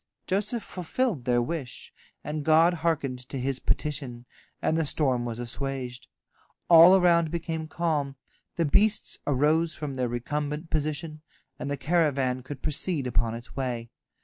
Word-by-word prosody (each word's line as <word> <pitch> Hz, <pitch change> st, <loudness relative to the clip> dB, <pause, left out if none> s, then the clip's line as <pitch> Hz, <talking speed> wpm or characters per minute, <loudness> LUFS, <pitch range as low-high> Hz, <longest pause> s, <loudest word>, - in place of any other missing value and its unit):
Joseph 210 Hz, +4 st, 0 dB
fulfilled 180 Hz, -, -2 dB
their 120 Hz, -1 st, +2 dB
wish, 140 Hz, -2 st, -6 dB, 0.3 s
and 150 Hz, 0 st, -4 dB
God 160 Hz, +3 st, +5 dB
hearkened 145 Hz, -6 st, 0 dB
to 135 Hz, -, -4 dB
his 130 Hz, 0 st, -1 dB
petition, 130 Hz, -5 st, -2 dB, 0.3 s
and 160 Hz, -, 0 dB
the 165 Hz, -, +2 dB
storm 130 Hz, -5 st, 0 dB
was 115 Hz, -1 st, -4 dB
assuaged. 125 Hz, +1 st, -5 dB, 0.6 s
All 170 Hz, +3 st, +10 dB
around 170 Hz, -3 st, +4 dB
became 165 Hz, -1 st, -3 dB
calm, 155 Hz, -5 st, -1 dB, 0.4 s
the 170 Hz, -, +1 dB
beasts 210 Hz, +8 st, +2 dB
arose 155 Hz, +4 st, +2 dB
from 150 Hz, -3 st, -5 dB
their 130 Hz, -2 st, -1 dB
recumbent 150 Hz, +6 st, -3 dB
position, 155 Hz, 0 st, -2 dB, 0.4 s
and -, -, -4 dB
the 145 Hz, -, -2 dB
caravan 135 Hz, -4 st, +1 dB
could 130 Hz, +1 st, -9 dB
proceed 155 Hz, -1 st, 0 dB
upon 115 Hz, -2 st, 0 dB
its 115 Hz, +1 st, -10 dB
way. 120 Hz, -4 st, -3 dB
150 Hz, 145 wpm, -27 LUFS, 130-165 Hz, 0.6 s, All